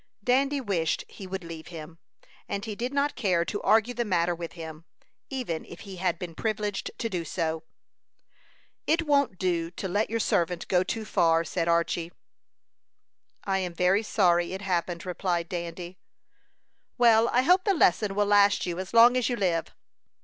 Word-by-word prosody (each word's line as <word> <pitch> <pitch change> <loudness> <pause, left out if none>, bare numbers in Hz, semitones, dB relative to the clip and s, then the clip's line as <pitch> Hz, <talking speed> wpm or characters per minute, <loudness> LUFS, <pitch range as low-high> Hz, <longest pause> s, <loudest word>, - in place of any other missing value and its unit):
Dandy 275 +4 +2
wished 180 -9 -1
he 195 - -10
would 190 0 -5
leave 165 -1 -9
him, 165 -1 -10 0.5
and 200 0 -3
he 220 - -4
did 240 +5 -3
not 280 +1 0
care 185 -8 +1
to 205 - -4
argue 225 +2 +3
the 240 0 -1
matter 175 -5 +1
with 170 -1 -7
him, 160 -2 -9 0.5
even 245 - -3
if - - -12
he 195 -3 -9
had 185 +1 0
been 175 -3 -7
privileged 210 +1 -2
to 230 - -2
do 180 -6 -3
so. 160 -1 -2 1.3
"It 330 +2 +2
won't 280 -9 +2
do 170 -3 -1
to 180 +2 -5
let 205 +4 0
your 230 +1 -1
servant 175 -4 0
go 180 -1 +3
too 220 +4 -3
far," 165 -4 +2
said 170 0 -2
Archy. 170 0 0 1.3
"I 195 -1 0
am 180 -2 -4
very 180 +4 +3
sorry 175 -5 +2
it 190 +1 -6
happened," 175 -2 -2
replied 175 -2 -2
Dandy. 175 +1 -6 1.0
"Well, 230 -2 +5
I 250 - +2
hope 365 +6 +4
the 400 -2 +2
lesson 195 - +2
will 205 0 +2
last 205 0 +4
you 175 0 -3
as 190 +4 -6
long 235 +2 +8
as 250 -2 +1
you 245 - 0
live." 175 -7 0
190 Hz, 175 wpm, -27 LUFS, 170-225 Hz, 1.3 s, long